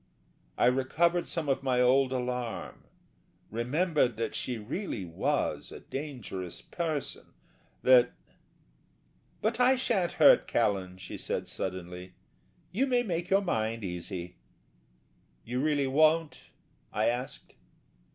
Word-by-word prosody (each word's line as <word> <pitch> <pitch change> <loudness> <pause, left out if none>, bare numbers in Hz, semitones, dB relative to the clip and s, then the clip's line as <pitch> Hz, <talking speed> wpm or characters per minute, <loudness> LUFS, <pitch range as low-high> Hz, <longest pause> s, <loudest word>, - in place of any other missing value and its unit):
I - - +3
recovered 160 +8 +2
some 165 -3 -3
of 135 - +1
my 130 -2 +1
old 130 +1 +4
alarm, 125 -2 -4 0.7
remembered 130 - +1
that 115 - -2
she 125 -2 -2
really 110 - -4
was 85 -1 -1
a - - -8
dangerous 125 - -6
person; 160 -5 -4 0.5
that... 125 -1 +6 1.3
"But 225 +3 0
I 250 +1 +6
sha'n't 210 -9 0
hurt - - +6
Callan," 95 -2 0
she 95 - -8
said, - - -3
suddenly, 90 0 -6 0.6
"you 250 +10 +1
may 245 -2 +2
make 175 -4 -3
your 195 +1 +4
mind 115 - -1
easy." 90 -1 -5 1.1
"You 125 +2 -2
really 145 -2 +2
won't?" 155 +3 +2 0.4
I 105 +1 0
asked. 125 +2 -3
130 Hz, 115 wpm, -30 LUFS, 110-165 Hz, 1.3 s, that